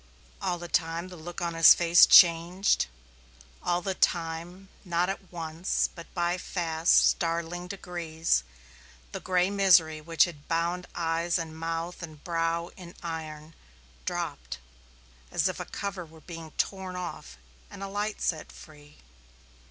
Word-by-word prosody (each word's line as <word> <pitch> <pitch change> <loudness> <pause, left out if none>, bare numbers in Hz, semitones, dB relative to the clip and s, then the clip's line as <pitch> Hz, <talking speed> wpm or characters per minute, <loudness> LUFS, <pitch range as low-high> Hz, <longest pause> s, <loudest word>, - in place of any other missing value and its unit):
All 180 - -1
the 175 0 -7
time 170 +1 -1
the 180 - -10
look 175 +2 -8
of 170 -1 -1
his 165 -1 +8
face 175 0 +6
changed; 175 +2 +5 0.7
all 175 0 0
the 190 - -1
time, 175 +2 -1
not 175 -1 0
at 195 -1 -6
once, 165 0 -1
but 170 -2 -12
by 175 0 0
fast, 165 -2 +3
startling 170 +1 -2
degrees, 170 - -1 0.7
the - - -5
gray 185 +1 +1
misery 175 -6 +4
which 165 +1 +3
had 150 -5 -10
bound 170 +2 -1
eyes 170 0 0
and 165 -2 -5
mouth 165 +2 -4
and 155 -3 -10
brow 170 0 -1
in 175 -2 -12
iron 160 -2 -6 0.5
dropped - - -4 0.7
as - - +1
if - - -4
a - - -4
cover 200 -2 -5
were 160 -1 -16
being 165 -1 -9
torn 190 -2 -2
off 175 - -7 0.3
and 195 - -9
a - - -4
light 205 +2 -3
set 160 -3 -2
free. 150 -2 -15
170 Hz, 145 wpm, -28 LUFS, 165-180 Hz, 0.7 s, his